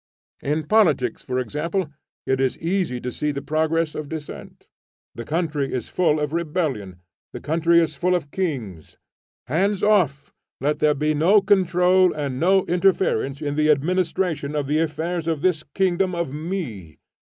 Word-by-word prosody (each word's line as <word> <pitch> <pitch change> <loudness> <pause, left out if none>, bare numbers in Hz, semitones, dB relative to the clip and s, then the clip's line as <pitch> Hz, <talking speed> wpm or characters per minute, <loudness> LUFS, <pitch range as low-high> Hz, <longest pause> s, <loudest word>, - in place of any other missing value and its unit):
In 150 +3 -1
politics 150 - +2
for 125 - -3
example 150 - -2 0.3
it 130 0 0
is 130 -1 0
easy 170 -7 -1
to 125 +1 -4
see 150 +4 -2
the 140 -1 -5
progress 160 +1 0
of 150 -2 -6
dissent. 160 -2 -8 0.5
The 115 - -7
country 155 -4 -1
is 125 - -4
full 160 -4 +1
of 150 0 -2
rebellion; 150 - -2 0.3
the - - -6
country 170 +2 +2
is 160 -2 +1
full 180 +5 +1
of 145 -5 -3
kings. 120 - -4 0.5
Hands 190 +8 0
off! 175 -10 +2 0.3
let 145 +3 0
there 150 -1 +3
be 150 +2 0
no 170 +8 +5
control 185 -2 +3
and 140 -4 -3
no 190 +3 +3
interference 175 -6 +1
in 145 -1 -2
the 155 +1 +1
administration 160 0 0
of 145 -2 -1
the 150 +3 +1
affairs 165 +2 -2
of 160 -3 -1
this 180 -4 +2
kingdom 185 -1 +1
of 170 -5 -3
me. 145 - -5
155 Hz, 160 wpm, -23 LUFS, 140-180 Hz, 0.5 s, no